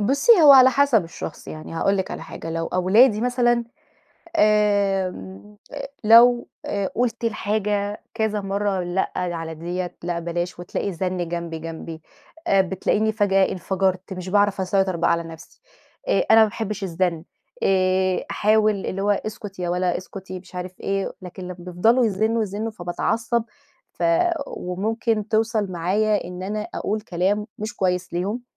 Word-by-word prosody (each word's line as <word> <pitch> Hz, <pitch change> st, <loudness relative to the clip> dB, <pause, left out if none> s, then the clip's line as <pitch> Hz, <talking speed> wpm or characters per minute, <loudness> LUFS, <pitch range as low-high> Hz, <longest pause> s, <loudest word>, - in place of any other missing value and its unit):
بُصي، 275 Hz, -, +4 dB
هو 290 Hz, -, +10 dB
على 260 Hz, -1 st, +8 dB
حسب 265 Hz, -7 st, +3 dB
الشخص. 165 Hz, -1 st, -8 dB
يعني 155 Hz, +1 st, -8 dB
هاقول 195 Hz, +4 st, +1 dB
لِك 190 Hz, -, -2 dB
على -, -, -6 dB
حاجة، 165 Hz, -, -8 dB
لو 165 Hz, 0 st, -2 dB
أولادي 210 Hz, +5 st, +4 dB
مثلًا 245 Hz, 0 st, +2 dB, 0.8 s
آمم، 195 Hz, -, +1 dB, 0.2 s
آآ، -, -, -6 dB, 0.2 s
لو 240 Hz, +2 st, +6 dB, 0.2 s
آآ 200 Hz, -1 st, -2 dB
قُلت 240 Hz, 0 st, -1 dB
الحاجة 210 Hz, -1 st, -1 dB
كذا 220 Hz, -2 st, 0 dB
مرّة 195 Hz, 0 st, -1 dB
لأ، 175 Hz, +2 st, -1 dB
ل 180 Hz, -1 st, -1 dB
على 165 Hz, -1 st, -5 dB
ديّة 175 Hz, +3 st, -5 dB
لأ، 175 Hz, 0 st, -2 dB
بلاش 175 Hz, +1 st, -3 dB
وتلاقي 175 Hz, +3 st, -3 dB
الزن 180 Hz, -1 st, -2 dB
جنبي، 170 Hz, -1 st, -4 dB
جنبي 165 Hz, 0 st, -8 dB, 0.4 s
آآ 195 Hz, -, +4 dB
بتلاقيني 200 Hz, +4 st, 0 dB
فجأة 195 Hz, -2 st, +2 dB
انفجرت، 190 Hz, +1 st, -1 dB
مش 185 Hz, 0 st, -6 dB
باعرف 205 Hz, 0 st, +2 dB
أسيطر 190 Hz, -1 st, +1 dB
بقى 170 Hz, 0 st, +1 dB
على 170 Hz, -, 0 dB
نفْسي. 165 Hz, -1 st, -12 dB, 0.5 s
آآ، -, -, +2 dB
أنا 225 Hz, 0 st, +8 dB
ما -, -, +7 dB
باحبش 215 Hz, -1 st, -5 dB
الزن، 170 Hz, -2 st, -1 dB, 0.4 s
آآ 185 Hz, -1 st, +2 dB
أحاول 215 Hz, -2 st, +2 dB
اللي 195 Hz, +1 st, -3 dB
هو 205 Hz, -, +1 dB
"اسكُت 205 Hz, -1 st, -4 dB
يا 180 Hz, -1 st, -2 dB
ولا 180 Hz, 0 st, 0 dB
اسكُتي." 185 Hz, 0 st, -8 dB
مش 185 Hz, 0 st, -17 dB
عارف 180 Hz, 0 st, -7 dB
إيه، 195 Hz, 0 st, -2 dB
لكن 185 Hz, +1 st, -9 dB
لمّا 180 Hz, 0 st, -7 dB
بيفضلوا 185 Hz, +8 st, +2 dB
يزنوا، 220 Hz, +3 st, +1 dB
يزنوا، 215 Hz, +2 st, -3 dB
فباتعصب 225 Hz, +5 st, -1 dB, 0.5 s
ف -, -, -8 dB, 0.4 s
وممكن 215 Hz, +4 st, -2 dB
توصل 220 Hz, -3 st, 0 dB
معايا 205 Hz, +5 st, +1 dB
إن 180 Hz, +1 st, -7 dB
أنا 210 Hz, +2 st, -3 dB
أقول 215 Hz, +1 st, -2 dB
كلام، 205 Hz, +1 st, -1 dB
مش 215 Hz, 0 st, -5 dB
كويس 180 Hz, -2 st, -1 dB
ليهم. 200 Hz, +8 st, -2 dB
195 Hz, 155 wpm, -23 LUFS, 180-215 Hz, 0.8 s, هو